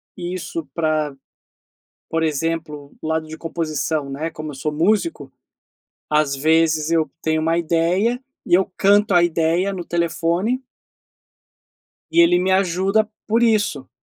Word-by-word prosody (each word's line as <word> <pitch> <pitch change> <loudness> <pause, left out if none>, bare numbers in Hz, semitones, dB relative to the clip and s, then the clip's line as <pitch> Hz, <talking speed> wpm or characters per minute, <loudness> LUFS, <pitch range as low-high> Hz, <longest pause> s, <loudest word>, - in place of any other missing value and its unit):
isso 175 -3 -5
pra, 155 -3 0 0.9
por 165 0 0
exemplo, 155 -2 -2
o - - -5
lado 160 0 -1
de 160 +1 -8
composição, 155 -3 -2
né, 155 +4 -3
como 155 -1 -7
eu - - -9
sou 150 +3 -2
músico, 205 - 0 0.8
às 150 -2 +2
vezes, 160 +1 +2
eu 160 -3 +2
tenho 160 0 0
uma 165 +1 +1
ideia 175 +9 +1 0.2
e 175 - -1
eu 190 +1 +3
canto 205 0 +4
a 175 - +6
ideia 170 +3 +1
no 180 -2 -5
telefone 170 +8 0 1.5
e 170 - +5
ele 175 +1 +5
me 185 +1 0
ajuda 195 +3 +2 0.2
por 230 +2 +2
isso, 205 - +1
165 Hz, 135 wpm, -21 LUFS, 155-185 Hz, 1.5 s, a